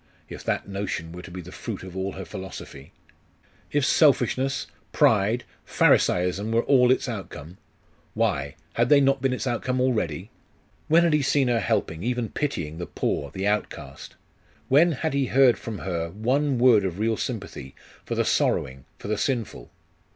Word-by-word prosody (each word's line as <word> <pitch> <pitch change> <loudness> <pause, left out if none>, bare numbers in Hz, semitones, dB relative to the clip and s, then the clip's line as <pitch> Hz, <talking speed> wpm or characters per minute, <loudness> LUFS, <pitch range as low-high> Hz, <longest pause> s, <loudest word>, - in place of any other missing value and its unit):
If - - -8
that - - -1
notion 95 -4 -4
were 90 +1 -8
to 90 - -11
be 90 +1 -7
the - - -11
fruit - - -6
of 95 -1 -10
all 95 +1 -3
her 95 - -7
philosophy? 95 -8 -9 0.8
If 145 -2 +1
selfishness, 135 -2 +2 0.3
pride, 110 +3 +3 0.2
Pharisaism, 90 +4 +2
were 115 +1 +2
all 125 -3 +4
its 130 - +2
outcome? 90 - -7 0.6
Why 70 0 0 0.2
had - - +1
they 145 -1 +7
not 135 -1 +2
been 135 0 +1
its 125 - -3
outcome 125 +1 -1
already? 105 - -1 0.6
When 165 +2 +5
had 170 -2 +2
he 150 - +3
seen 135 -1 +2
her 120 -1 +2
helping, 80 -5 -1
even 120 0 -2
pitying, 85 - -3
the 85 - -5
poor, 70 - -2
the 95 +7 -4
outcast? 105 -9 -3 0.5
When 160 +5 +5
had 155 +2 -2
he 140 -2 +1
heard 130 -1 +4
from 110 -3 -6
her 85 -4 -3
one 130 - 0
word 120 -4 +5
of 95 -2 -3
real 110 +2 +1
sympathy 65 -8 -6 0.3
for - - -4
the - - +1
sorrowing; 65 0 0
for - - -9
the 105 0 -1
sinful?.... 120 - -2
110 Hz, 170 wpm, -25 LUFS, 90-130 Hz, 0.8 s, they